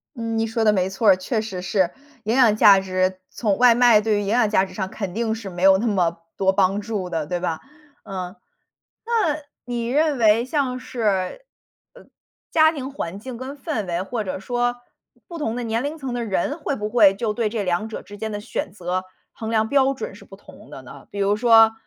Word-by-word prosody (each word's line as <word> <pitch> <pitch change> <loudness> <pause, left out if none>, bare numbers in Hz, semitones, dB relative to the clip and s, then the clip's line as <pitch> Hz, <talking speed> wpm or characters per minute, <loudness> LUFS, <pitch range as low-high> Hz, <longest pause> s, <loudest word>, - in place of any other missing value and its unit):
嗯， 230 -1 -3
你 225 - 0
说 225 0 -1
的 215 -1 +4
没 185 -1 +1
错 200 +2 +2
儿， 190 - +7
确 215 +4 -2
实 195 -5 -6
是。 185 -2 +1 0.3
营 225 +2 0
养 240 -5 +5
价 200 -2 +7
值 185 0 -1
从 210 -4 -1
外 245 -1 +6
卖 240 -3 +5
对 215 -1 +1
于 - - +1
营 200 - -4
养 225 0 +2
价 195 -2 +3
值 - - -13
上 190 -3 -3
肯 195 -4 -5
定 225 +1 -1
是 220 -3 -6
没 175 0 -6
有 190 0 +7
那 230 +4 -1
么 175 -5 0 0.2
多 190 0 +3
帮 195 +1 +2
助 200 -4 -4
的， 160 -3 -2
对 175 +3 -3
吧。 170 -3 -2 0.4
嗯。 185 -1 -6 0.7
那 430 -11 +1 0.2
你 240 -1 -3
认 295 +1 +1
为 225 +1 +4
像 260 -2 -1
是， 215 - -2 0.5
呃， - - -15 0.5
家 315 -1 +5
庭 275 -3 -5
环 195 -8 -5
境 250 +2 -8
跟 265 +4 -7
氛 260 - -3
围 175 +1 -2
或 220 +3 -3
者 190 - -4
说， 245 +3 -1 0.5
不 340 - -7
同 225 -8 -2
的 245 - -3
年 225 +1 -1
龄 300 +3 -3
层 270 -4 -5
的 240 -1 -2
人 220 - -1
会 285 - -2
不 210 0 -3
会 215 -4 +5
就 215 +1 -2
对 220 0 -1
这 215 -1 -2
两 180 +4 -1
者 220 - -7
之 205 - -12
间 220 +1 -4
的 205 - -4
选 205 - -4
择 185 -1 -3 0.3
衡 220 -1 -6
量 220 -1 +1
标 275 0 +3
准 460 - -6
是 - - -14
不 - - -14
同 - - -16
的 - - -9
呢？ - - -13
比 200 - -8
如 200 +1 +2
说， 225 -1 +6
220 Hz, 240 characters per minute, -22 LUFS, 190-245 Hz, 0.7 s, 儿